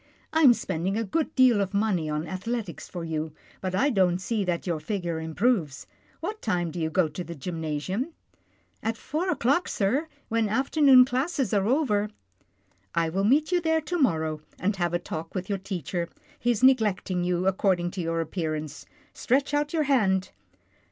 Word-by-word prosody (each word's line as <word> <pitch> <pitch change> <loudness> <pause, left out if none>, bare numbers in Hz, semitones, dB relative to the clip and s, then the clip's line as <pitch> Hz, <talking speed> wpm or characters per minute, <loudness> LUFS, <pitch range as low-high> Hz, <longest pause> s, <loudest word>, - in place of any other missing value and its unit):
" - - -35
I 320 - +3
am 260 -6 +8
spending 185 +3 -2
a 230 - 0
good 280 +10 -2
deal 250 -5 +5
of 195 0 -2
money 195 -7 +1
on 150 +1 -2
ath 185 +2 -6
letics 230 -7 -4
for 175 -2 -6
you, 160 -1 -3 0.3
but 185 -1 -2
I 275 +9 +3
don't 185 -5 +3
see 210 +3 -1
that 175 -2 -1
your 170 -4 -1
figure 170 -1 -3
improves. 160 - 0 0.4
What 435 +1 -4
time 175 -6 -1
do 175 - -5
you 160 -1 0
go 170 +1 +2
to 165 +4 -5
the 170 0 -8
gymna 160 +1 -4
sium? 200 - -3 0.3
" - - -39 0.3
"At 225 +1 -2
four 330 +10 -2
o'clock, 280 +4 +2
sir, 250 +10 0 0.2
when 225 -1 +1
afternoon 265 +2 +6
classes 265 - -1
are 200 -1 +2
over." 220 -6 +2 0.4
" 100 0 -42 0.3
I 165 -1 +2
will 195 +4 0
meet 295 - +3
you 355 -1 +3
there 320 -1 +2
to 350 +3 -3
morrow, 160 - +1 0.2
and 200 +3 0
have 175 -1 0
a - - +4
talk 165 0 -7
with 185 +1 -3
your 200 -1 -1
teacher. 175 -2 -4 0.3
He's 240 -1 0
neglecting 210 -8 +3
you, 180 0 0
ac 190 0 +1
cording 175 -3 +2
to 185 - -4
your 165 0 -1
appearance. 155 -2 -4 0.3
Stretch 275 +3 0
out 295 0 +1
your 320 -2 +1
hand." 200 -9 +2
195 Hz, 195 wpm, -26 LUFS, 170-255 Hz, 0.4 s, am